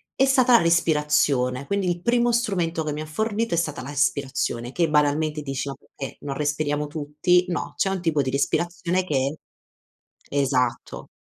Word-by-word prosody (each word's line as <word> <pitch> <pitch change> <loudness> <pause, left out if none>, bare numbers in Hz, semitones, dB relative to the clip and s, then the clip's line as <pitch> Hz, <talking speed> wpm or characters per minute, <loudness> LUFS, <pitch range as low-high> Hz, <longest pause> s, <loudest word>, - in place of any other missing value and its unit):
è 270 - +4
stata 260 -2 +4
la - - +6
respirazione. 150 -6 +2
Quindi 200 -2 0
il 175 0 -2
primo 240 +3 +2
strumento 180 -9 0
che 150 -1 -3
mi 150 - -4
ha 155 - -5
fornito 220 +5 -1
è - - -2
stata 150 -5 -1
la 135 - -8
respirazione, 135 -4 -1
che 170 -3 +1
banalmente 150 +1 +1
dici: 135 -1 -3
"Ma 135 - -5 0.2
perché 135 - -7
non 140 -1 -4
respiriamo 150 0 -1
tutti?" 155 +4 +1
No, 175 - -3
c'è 195 - +1
un 190 -2 -2
tipo 160 -4 +1
di 130 - -2
respirazione 175 +5 0
che 140 -1 -1 0.9
esatto. 130 -3 -1
150 Hz, 170 wpm, -24 LUFS, 140-180 Hz, 0.9 s, la